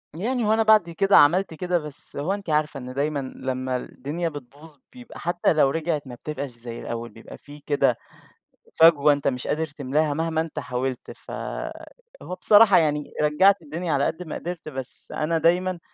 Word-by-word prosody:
يعني 235 +7 -1
هو 215 - +3
أنا 225 0 +3
بعد 215 -5 +5
كده 195 +4 +3
عملت 175 +5 +4
كده، 180 +2 -1
بس 150 -2 -4
هو 150 +7 -1
أنتِ 200 -3 -6
عارفة 150 -1 0
إن 125 0 -8
دايمًا 145 +2 -1 0.2
لمّا 130 0 -3
الدنيا 150 +7 -4
بتبوظ، 145 +2 -12 0.2
بيبقى 245 -2 -12
حتى 175 0 +1
لو 150 -3 +4
رجَعت، 155 -1 -2
ما 125 - -8
بتبقاش 140 +2 -5
زي 120 0 -9
الأوَّل، 115 0 -5
بيبقى 110 +1 -13
في 145 +1 -13
كده 140 -4 +1 0.8
فجوة 150 -3 +7
أنتَ 145 -1 0
مش 125 -2 -3
قادِر 160 +1 -1
تملاها 145 +1 -1
مهما 160 +1 -1
أنتَ 160 -1 -5
حاوَلت. 130 -1 -4
فهو - - -8
بصراحة 205 -2 +6
يعني 150 -2 0
رجَّعت 190 +6 +4
الدنيا 165 +2 -4
على 140 -1 +2
قد 170 - -3
ما 160 - -7
قدِرت، 175 -2 -6
بس 130 -4 -2
أنا 165 +2 0
دايمًا 175 +3 +1
155 Hz, 175 wpm, -24 LUFS, 140-175 Hz, 0.8 s, فجوة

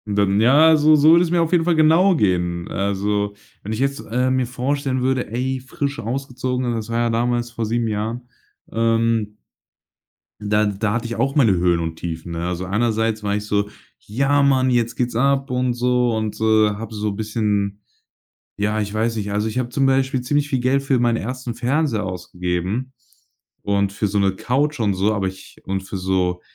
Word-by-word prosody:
Dann 100 0 +2
ja, 155 +7 +6
so 155 +1 +5
so 150 +2 +6
würde 170 +1 +6
es 165 - -4
mir 175 -1 +3
auf 165 - 0
jeden 170 -2 +3
Fall 175 -2 +2
genau 165 +4 +4
gehen, 90 - 0
also, 100 +1 -1 0.3
wenn 110 +2 -5
ich 110 - -4
jetzt, 140 -1 0
äh, 125 +2 +1
mir 130 -2 +1
vorstellen 135 +1 -2
würde: 130 -2 0
„Ey, 130 +3 -2
frisch 140 +2 -4
ausgezogen”, 125 +1 -3
und 120 -1 -1
das 110 0 -5
war 115 - -1
ja 120 0 +1
damals 120 +1 0
vor 115 -2 -3
7 115 +1 -1
Jahren, 110 +3 -3 0.5
ähm 115 -1 0 1.0
da 105 +1 +1
da 105 +1 -1
hatte 115 +1 -2
ich 115 - -4
auch 135 +5 0
meine 115 -9 +4
Höhen 85 -1 +2
und 80 -1 -3
Tiefen, 85 0 -6
ne? 85 +1 -3
Also, 90 +1 -3
einerseits 110 +1 0
war 100 0 0
ich 105 0 -3
so: 105 0 0 0.3
„Ja, 140 +6 +1
Mann, 130 -2 +3
jetzt 120 -1 +1
geht's 120 -2 -2
ab 135 +2 +1
und 125 -1 0
so” 125 0 +1
und, 110 -1 -3
äh, 110 -1 +4
habe 115 +1 -7
so 105 0 -2
bisschen 105 -1 -2 0.8
ja, 105 +1 0
ich 105 0 -3
weiß 115 +1 0
nicht, 100 -1 -3
also, 105 +2 0
ich 125 - -6
habe 125 - -1
zum 135 +2 +1
Beispiel 135 -1 +1
ziemlich 145 +3 0
viel 130 - 0
Geld 130 +2 +1
für 135 -2 +1
meinen 120 -1 +2
1. 125 +1 -5
Fernseher 125 -4 0
ausgegeben 90 +7 -3 0.7
und 100 -1 +1
für 105 0 -1
so 105 - -2
'ne 95 -1 +2
Couch 140 +7 -1
und 100 -2 +2
so, 100 +3 +1
aber 95 -2 -1
ich 95 0 -10
und 95 0 -2
für 95 0 -6
so 90 -1 -1
115 Hz, 200 wpm, -21 LUFS, 105-130 Hz, 1.0 s, ja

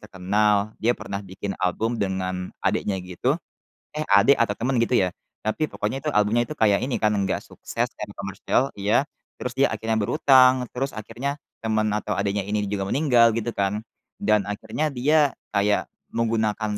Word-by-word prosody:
terkenal, 105 +1 +1
dia 120 +2 +2
pernah 100 0 -5
bikin 95 +1 -5
album 110 +6 0
dengan 95 -3 -2
adiknya, 100 -2 0
gitu, 90 - -1 0.6
eh, 155 - -1
adik 100 +8 +6
atau 115 -3 +2
teman 125 +2 0
,gitu 120 +1 +2
ya. 95 - +2 0.4
Tapi 155 +8 0
pokoknya 130 +7 -3
itu 150 - +2
albumnya 105 +3 +3
itu 155 - -3
kayak 105 -3 +4
ini 125 -2 -1
kan 105 0 +2
enggak 95 -1 0
sukses 120 +1 -3
dan 105 - -5
komersil, 100 +7 0
iya. 105 +8 +1 0.3
Terus 125 - -4
dia 140 - +3
akhirnya 110 +1 -1
berhutang, 130 +1 +5
terus 135 +2 -1
akhirnya 120 +7 -4 0.3
teman 110 -1 +1
atau 105 0 -3
adiknya 100 0 0
ini 105 0 -1
juga 100 -1 -2
meninggal, 125 -5 +4
gitu 115 +1 -2
kan, 100 +2 0 0.4
dan 105 -1 +2
akhirnya 110 +9 -2
dia 145 +1 +2 0.2
kayak 100 0 +2 0.3
menggunakan 110 -2 0
110 Hz, 165 wpm, -24 LUFS, 100-125 Hz, 0.6 s, adik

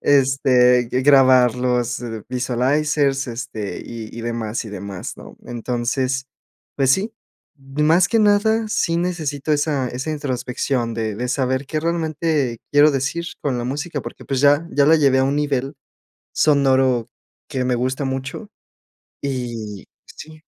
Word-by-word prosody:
este, 130 -3 +4
grabar 130 -2 +5
los 125 -1 -1 0.3
visualizers, 135 +3 +1
este, 115 -3 -5
y 115 -1 -8
y 115 - -5
demás, 115 0 -3
y 110 - -8
demás, 100 -2 -6
¿no? - - -12
Entonces, 125 +3 -2 0.5
pues 135 -2 +2
sí, 210 +8 0 0.5
más 150 +6 +2
que 230 - +2
nada, 215 +2 +3
sí 170 -6 0
necesito 155 -5 -2
esa 145 -3 0
esa 130 +6 -4
introspección 125 -4 -2
de 110 -2 -2
de 125 +3 -2
saber, 130 +1 -1
qué 155 +2 -2
realmente 155 -6 -1
quiero 145 +1 +6
decir 140 +5 -2 0.2
con 130 -4 -1
la 120 - -3
música, 145 +4 -3
porque 120 - -9
pues, 135 -2 -1
ya 145 +3 +4
ya 140 0 +3
la 160 +1 +6
llevé 140 -3 +3
a - - +3
un 140 +1 0
nivel 140 -1 -1 0.6
sonoro 130 -5 +3 0.4
que 130 -3 -2
me 125 -1 +1
gusta 130 +3 -1
mucho, 135 +10 -5 0.7
y 120 -7 -4 0.2
Sí. 155 0 -12
135 Hz, 140 wpm, -21 LUFS, 125-150 Hz, 0.7 s, quiero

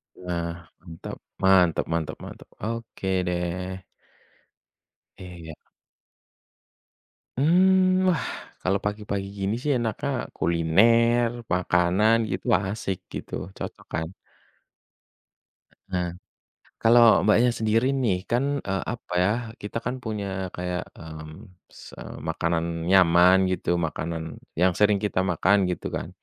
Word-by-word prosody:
Nah, 85 -1 -5
mantap, 85 -2 -9 0.3
mantap 90 -3 +4
mantap 80 -2 -2
mantap - - -10 0.2
oke 115 -3 -4 0.2
deh. 90 +1 -3 1.3
Eh 95 - -10 0.2
iya. 80 -1 -9 1.8
Hmm, 185 +3 +4 0.5
kalau 95 +2 +1
pagi-pagi 105 -1 -3
gini 95 +1 0
sih 150 - 0
enaknya 115 -3 -2 0.3
kuliner, 115 +8 +3 0.2
makanan 90 +4 +3 0.2
gitu 95 +5 -4 0.2
asik 95 -1 -3 0.2
gitu, - - -7 0.2
cocok - - -7
kan? 80 0 -1 1.8
Heeh. 90 -1 -1 0.7
Kalau 115 -3 +6
mbaknya 110 +3 +5
sendiri 115 +2 +1
nih 100 -6 +2
kan, 120 +3 +2 0.2
eee, 95 -2 -2
apa 115 -6 -9
ya 95 - +3 0.3
kita 105 +2 -5
kan 125 +2 -1
punya 100 -4 -4
kayak, 90 0 -3
hmm 80 +5 -10 0.2
se - - -14 0.3
makanan 85 0 -1
nyaman 90 0 +6
gitu 95 - -2 0.2
makanan 80 0 -5 0.2
yang 90 +1 +4
sering 105 0 +4
kita 105 -3 -1
makan 95 +4 +3
gitu 90 - -4
kan. - - -4
95 Hz, 110 wpm, -25 LUFS, 85-110 Hz, 1.8 s, Kalau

